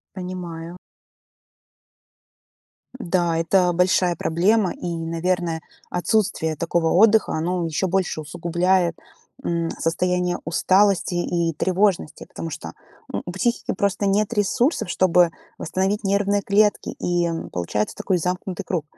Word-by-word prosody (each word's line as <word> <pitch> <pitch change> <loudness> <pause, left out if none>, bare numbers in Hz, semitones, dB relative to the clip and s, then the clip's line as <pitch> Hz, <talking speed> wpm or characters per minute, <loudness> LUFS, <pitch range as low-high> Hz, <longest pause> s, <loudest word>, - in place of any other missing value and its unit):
Понимаю. 175 -2 -6 2.2
Да, 175 -5 0
это 180 +2 +3
большая 180 0 +2
проблема. 185 +6 +2
И, - - -7
наверное, 165 0 -1 0.3
отсутствие 175 -3 0
такого 170 +1 0
отдыха, 220 +3 +5
оно 175 +2 -1
ещё 165 +4 -1
больше 185 -3 0
усугубляет, 170 +2 0 0.5
м, 170 -1 -1
состояние 180 +2 0
усталости 185 +3 +2
и 170 -1 0
тревожности. 185 -1 0
Потому 165 - -6
что, 155 0 -7 0.4
ну, - - -4
у 175 - -6
психики 235 +6 -1
просто 200 +1 0
нет 200 +3 +1
ресурсов, 215 - +1
чтобы 180 -2 +4 0.3
восстановить 190 +5 -1
нервные 200 +1 +1
клетки. 205 +2 +2
И 175 -1 +1 0.2
получается 95 +5 -2
такой 185 -2 0
замкнутый 180 +2 -3
круг. 170 -5 -2
180 Hz, 115 wpm, -22 LUFS, 165-195 Hz, 2.2 s, отдыха